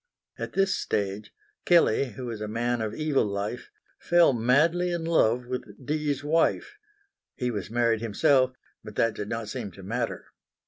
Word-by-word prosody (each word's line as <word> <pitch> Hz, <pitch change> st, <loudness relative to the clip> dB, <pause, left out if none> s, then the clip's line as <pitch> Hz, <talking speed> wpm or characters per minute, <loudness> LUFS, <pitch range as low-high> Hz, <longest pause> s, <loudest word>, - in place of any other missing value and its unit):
At -, -, -5 dB
this 195 Hz, 0 st, +2 dB
stage 100 Hz, +1 st, -2 dB, 0.3 s
Kelley, 140 Hz, -8 st, +3 dB
who 125 Hz, +5 st, -7 dB
was 115 Hz, -3 st, -5 dB
a 105 Hz, -, -3 dB
man 120 Hz, +2 st, -1 dB
of 110 Hz, 0 st, -3 dB
evil 155 Hz, -3 st, +1 dB
life, 105 Hz, +4 st, -4 dB, 0.3 s
fell 170 Hz, -4 st, +4 dB
madly 155 Hz, +10 st, +2 dB
in 170 Hz, -1 st, -2 dB
love 125 Hz, -7 st, +2 dB
with 125 Hz, +1 st, -3 dB, 0.2 s
Dee's 150 Hz, -1 st, -1 dB
wife. 165 Hz, -, +1 dB, 0.6 s
He 125 Hz, -2 st, -2 dB
was 100 Hz, -5 st, -4 dB
married 115 Hz, -1 st, +1 dB
himself, 130 Hz, +3 st, +2 dB, 0.3 s
but 105 Hz, -1 st, -10 dB
that 115 Hz, -1 st, +2 dB
did 105 Hz, -, -6 dB
not 115 Hz, -2 st, -4 dB
seem 100 Hz, -, -4 dB
to 95 Hz, -, -12 dB
matter. 115 Hz, +4 st, -3 dB
120 Hz, 165 wpm, -27 LUFS, 110-150 Hz, 0.6 s, fell